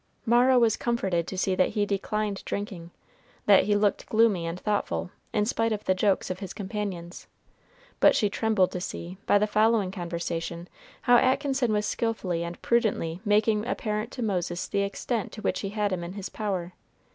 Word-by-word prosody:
Mara 245 +2 +5
was 230 -3 +4
comforted 190 -8 0
to 190 - -5
see 190 0 +1
that 185 0 +3
he 205 - +3
declined 205 0 -2
drinking, 195 -5 -5 0.6
that 200 -2 +6
he 205 - +2
looked 205 -1 +1
gloomy 215 -6 +3
and 165 +2 -4
thoughtful, 90 - -1 0.2
in 210 -2 +1
spite 225 0 0
of 210 -1 -2
the 185 - +3
jokes 190 0 +1
of 185 - -5
his 195 -3 -6
companions; 190 -4 -5 0.7
but - - +6
she 210 - +3
trembled 205 -2 +1
to 180 - -4
see, 180 +1 -6
by - - +5
the 205 - +3
following 215 -2 +2
conversation, 170 -1 -4 0.4
how 245 0 +6
Atkinson 265 -1 +2
was 210 0 +1
skillfully 195 -8 -1
and 170 0 -6
prudently 205 -8 +1
making 210 0 +2
apparent 215 -2 -2
to 250 - -4
Moses 180 -4 -2
the 200 - 0
extent 205 +3 -2
to 215 - -8
which - - 0
he 195 - -3
had 210 0 -1
him 175 -2 -3
in 170 +1 -6
his 200 -1 -6
power. 185 -5 -3
205 Hz, 180 wpm, -27 LUFS, 180-220 Hz, 0.7 s, that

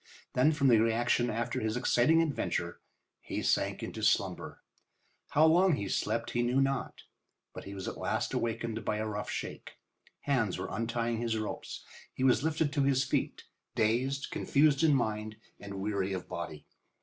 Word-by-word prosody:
Then 130 +5 +4
from 145 -3 +2
the 115 -4 +6
reaction 115 +2 +2
after 120 +2 -2
his 110 +2 -1
exciting 145 +6 +4
adventure 90 - -2 0.4
he - - -4
sank - - +1
into - - -5
slumber. - - 0 0.7
How 150 +2 +4
long 175 +3 +5
he 100 - -4
slept 110 +4 -1
he 120 - 0
knew 125 +2 +2
not, 135 -1 -1 0.5
but - - -9
he 100 - -7
was 95 - -6
at - - -5
last - - -1
awakened 115 -1 -2
by 105 0 -1
a 110 - -2
rough 105 -1 -4
shake. - - -5 0.5
Hands 120 -9 0
were 95 - -4
untying 115 +2 -1
his 115 -1 -1
ropes. 110 -1 -5 0.3
He 130 - -2
was 130 -1 +4
lifted 160 -2 0
to 145 - +1
his 135 -1 +3
feet, 130 - -2 0.3
dazed, 130 +6 0
confused 145 -1 +3
in 155 -3 +5
mind, 110 -3 -1 0.2
and 100 -1 -8
weary 100 -1 -1
of 95 - -5
body. - - -6
120 Hz, 170 wpm, -31 LUFS, 110-140 Hz, 0.7 s, the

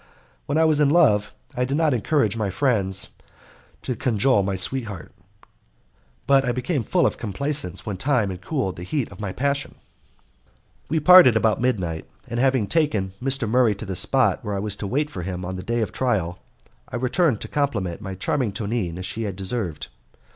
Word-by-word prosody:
When 150 - 0
I 160 - +4
was 155 -2 +3
in 145 -2 +4
love 110 -11 +3 0.2
I 125 - 0
did 135 +3 -1
not 160 -3 +2
encourage 120 -2 +1
my 110 -3 -1
friends 95 -4 +1 0.7
to 125 - -2
cajole 115 0 +2
my 95 0 -1
sweetheart, 105 - -3 1.1
but 135 -1 +4
I 125 - 0
became 125 +4 -1
full 175 - +1
of - - 0
complaisance 140 - -3
when 105 -3 -4
time 120 -4 +1
had 90 0 -8
cooled 125 - -2
the - - -7
heat 125 +5 -2
of 100 - -12
my 100 -3 -3
passion. 140 +5 -2 1.1
We 160 - +1
parted 180 -7 +8
about 110 +1 +2
midnight, 95 -10 -1 0.2
and 120 - -3
having 130 -4 +2
taken 110 - 0
Mr. 135 -2 0
Murray 115 -1 +3
to 105 - -8
the 95 -2 -4
spot 125 +9 +2
where 105 -2 -3
I - - -2
was 105 0 -2
to 100 - -4
wait 145 +7 -1
for 90 - -6
him 90 0 -5
on 95 +1 -4
the 95 - -5
day 115 +4 -1
of 110 - -2
trial, 95 -9 -1 0.5
I - - -6
returned 130 - +1
to - - -5
compliment 105 - -2
my 95 -3 -6
charming 110 +3 -1
Tonine 100 -6 -3
as 90 - -5
she 110 +2 -3
deserved. 95 -3 -3
115 Hz, 190 wpm, -23 LUFS, 95-135 Hz, 1.1 s, parted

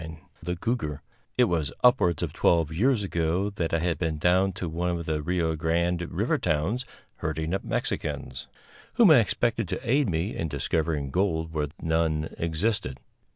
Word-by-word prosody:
_ 80 0 -8 0.2
The 90 +2 -3
Cougar 85 - -2 0.3
It 125 - +6
was 80 - 0
upwards 105 -10 +4
of - - -3
twelve 85 -3 +2
years 115 +5 +2
ago 90 +2 0
that 85 -4 -2
I 80 - +2
had 85 -2 -1
been 80 -3 -1
down 90 +4 +3
to 90 0 -4
one 85 +2 -2
of 85 -1 -2
the 80 -1 -1
Rio 80 0 0
Grande 85 +2 0
River - - 0
towns 90 - 0 0.3
herding 80 +2 -2
up 95 - -1
Mexicans, - - -3 0.5
whom 225 -8 +7
I 145 - +8
expected 115 0 0
to - - -5
aid 135 0 +3
me 85 +5 -1
in 80 - -2
discovering 75 0 -1
gold 80 -3 0
where 75 -2 0
none 80 -1 0
existed. 80 - -1
85 Hz, 170 wpm, -27 LUFS, 80-95 Hz, 0.5 s, I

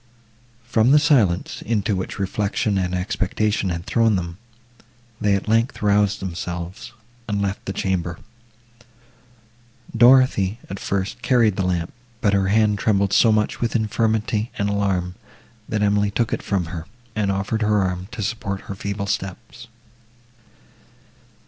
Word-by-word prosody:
From 120 0 +2
the 145 - +7
silence, 120 - +2
into 105 -2 0
which 95 - -4
reflection 100 +1 -1
and 90 -1 -1
expectation 95 +2 -1
had 85 0 -4
thrown 115 -3 +2
them, 85 0 -4 0.8
they, 100 -1 +2
at 100 - -3
length, 115 +2 +1
roused 100 0 +3
themselves, 90 +2 -5 0.4
and 105 -2 -1
left 100 0 -2
the - - -3
chamber. 90 -3 -2 1.8
Dorothée, 120 -5 +5
at 95 - -5
first, 100 +4 -3
carried 120 -4 +3
the 95 - -1
lamp, 90 -2 -1 0.3
but 100 -3 +2
her 95 -1 +2
hand 105 0 +2
trembled 100 -2 +1
so 115 - +5
much 105 0 0
with 120 0 -1
infirmity 110 0 0
and 100 0 0
alarm, 95 -3 0 0.6
that 105 -1 0
Emily 105 0 +2
took 115 +3 -1
it - - -2
from 95 -4 -1
her, 80 -1 -6 0.3
and 105 -2 +1
offered 100 +3 -2
her 105 -2 +2
arm, 90 0 -3
to 115 -3 -5
support 100 -2 -3
her - - -7
feeble 100 +1 -4
steps. 115 +5 -5
100 Hz, 140 wpm, -22 LUFS, 95-110 Hz, 1.8 s, the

